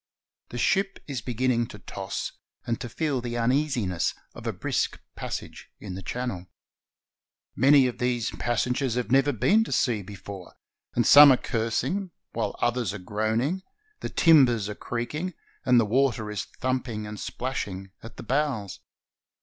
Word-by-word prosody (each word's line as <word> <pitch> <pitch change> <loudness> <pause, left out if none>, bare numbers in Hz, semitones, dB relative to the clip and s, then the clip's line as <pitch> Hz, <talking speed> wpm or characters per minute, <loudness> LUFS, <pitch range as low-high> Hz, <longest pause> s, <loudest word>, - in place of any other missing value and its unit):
The 120 - -6
ship 195 - +1
is 135 -5 -3
beginning 120 0 0
to 105 - -10
toss 100 -2 -5 0.3
and 115 -2 -2
to 120 - -5
feel 140 +2 -1
the 120 0 -4
uneasiness 120 - +1 0.2
of - - -8
a - - +1
brisk - - -1 0.2
passage - - -6
in 100 -3 -7
the 95 - -6
Channel. 110 -4 -4 1.1
Most 135 +2 +6
of 125 - -4
these 125 -2 0
passengers 125 +1 0
have 125 -1 -2
never 135 +2 +4
been 195 - +3
to - - -7
sea 115 -5 +1
before, 100 -1 -9 0.4
and 120 - +2
some 145 -1 +10
are 130 - +5
cursing, 130 - -1 0.2
while - - -2
others 120 -4 0
are - - -3
groaning; 110 - -1 0.4
the - - -4
timbers 130 - +5
are 105 - -4
creaking, 150 - -4 0.3
and 125 -1 +6
the 115 - +3
water 115 -2 +1
is 105 - -3
thumping 125 -4 -3
and 105 0 -7
splashing 95 -7 -4
at 115 - -11
the - - -7
bows. 130 -6 -1
120 Hz, 155 wpm, -26 LUFS, 105-135 Hz, 1.1 s, some